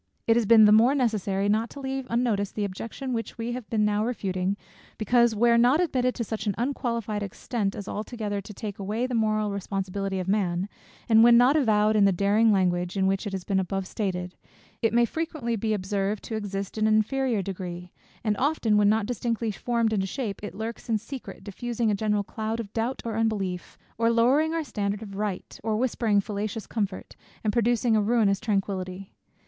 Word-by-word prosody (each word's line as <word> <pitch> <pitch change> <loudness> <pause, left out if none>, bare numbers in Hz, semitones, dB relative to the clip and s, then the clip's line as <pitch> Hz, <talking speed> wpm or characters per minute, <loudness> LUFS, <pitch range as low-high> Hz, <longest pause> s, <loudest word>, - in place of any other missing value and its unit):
It 225 - +4
has 235 -3 +2
been 220 -1 +8
the 210 - +6
more 230 +6 +6
necessary 205 -6 0
not 220 +3 +1
to 285 - -10
leave 265 -1 -4
unnoticed 225 -4 0
the 210 - 0
objection 230 +7 -5
which 230 +1 -4
we 230 +1 -3
have 245 -3 -6
been 215 -2 +2
now 210 0 +1
refuting, 195 -4 -1 0.4
because, 235 +1 +3
where 235 +2 +4
not 250 +6 +4
admitted 255 -8 +1
to 235 - -2
such 220 0 -4
an 200 - 0
unqualified 235 -4 -2
extent 200 +1 -3
as 200 - -7
altogether 210 -2 -4
to 205 - -11
take 205 0 -6
away 210 +5 -1
the 255 - -4
moral 215 -2 +1
responsibility 195 0 -3
of 185 -1 -3
man, 190 -2 0 0.4
and 225 -1 +6
when 235 0 +8
not 250 +4 +5
avowed 215 -6 +3
in 205 -2 +5
the 195 - +5
daring 205 +4 +3
language 180 -1 +1
in 190 - +2
which 195 +2 0
it - - -4
has 190 -2 -3
been 195 0 0
above 190 +1 -2
stated; 185 -3 -3 0.5
if 225 - +2
may 235 +1 +4
frequently 310 -4 -3
be 220 +1 -1
observed 200 0 -1
to 225 - -5
exist 200 -1 -4
in 215 - +3
an 215 - +4
inferior 235 -1 +1
degree: 180 -2 -6 0.3
and 215 -2 +1
often, 260 -6 +2
when 205 -1 +5
not 220 0 +2
distinctly 230 -1 -2
formed 230 +1 0
into 195 -2 0
shape, 220 -2 -4
it 210 - -6
lurks 225 +2 -6
in 225 - +3
secret, 250 +5 -9
diffusing 230 +2 -2
a - - +2
general 210 0 0
cloud 220 +2 -4
of 215 -3 -6
doubt 235 +3 -2
or 225 -2 -3
unbelief, 200 -5 -2 0.2
or 230 0 +3
lowering 255 +7 +3
our 330 -1 -1
standard 205 -5 -3
of 200 -2 -9
right, 205 -2 -4
or 220 -1 0
whispering 230 -3 +1
fallacious 210 +2 -3
comfort, 200 -4 -4 0.3
and 210 -2 0
producing 235 0 +2
a 215 - +3
ruinous 210 -3 +2
tranquillity. 195 -3 -3
215 Hz, 200 wpm, -26 LUFS, 200-235 Hz, 0.5 s, been